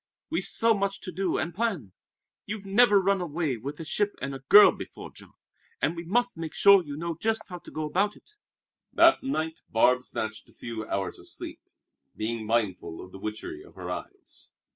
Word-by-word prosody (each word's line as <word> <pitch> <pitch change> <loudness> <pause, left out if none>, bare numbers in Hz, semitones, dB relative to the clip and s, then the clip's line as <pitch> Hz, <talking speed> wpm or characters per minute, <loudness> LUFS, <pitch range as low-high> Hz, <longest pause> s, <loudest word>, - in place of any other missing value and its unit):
"We've - - 0
so 230 -1 +5
much 200 -1 -1
to 185 - -6
do 185 +1 -1
and 165 - -2
plan. 185 - -2 0.6
You've 205 -1 -5
never 205 +1 +5
run 195 0 +1
away 160 -5 -2
with 140 +6 -7
a 165 - -6
ship 205 +6 +1
and 140 - -4
a 135 - -6
girl 205 +11 +8
before, - - -9
Jean, - - -12 0.5
and - - 0
we 170 - -6
must 240 +5 0
make 165 -1 -6
sure 200 -2 +7
you 145 -2 -7
know 170 +1 -3
just 225 0 0
how 180 -1 -7
to - - -13
go 155 - -4
about 195 +7 0
it." - - -21 0.6
That 335 0 +5
night 160 - -3
Barbe 125 +3 +4
snatched 110 -3 -5
a - - -21
few 110 -2 -6
hours 95 -2 -3
of - - -13
sleep, - - -8 0.6
being 110 0 -3
mindful 105 -7 -1
of 90 - -10
the 95 - -10
witchery 110 - -6
of 395 - -17
her - - -6
eyes. 395 -1 -8
170 Hz, 200 wpm, -27 LUFS, 125-205 Hz, 0.6 s, girl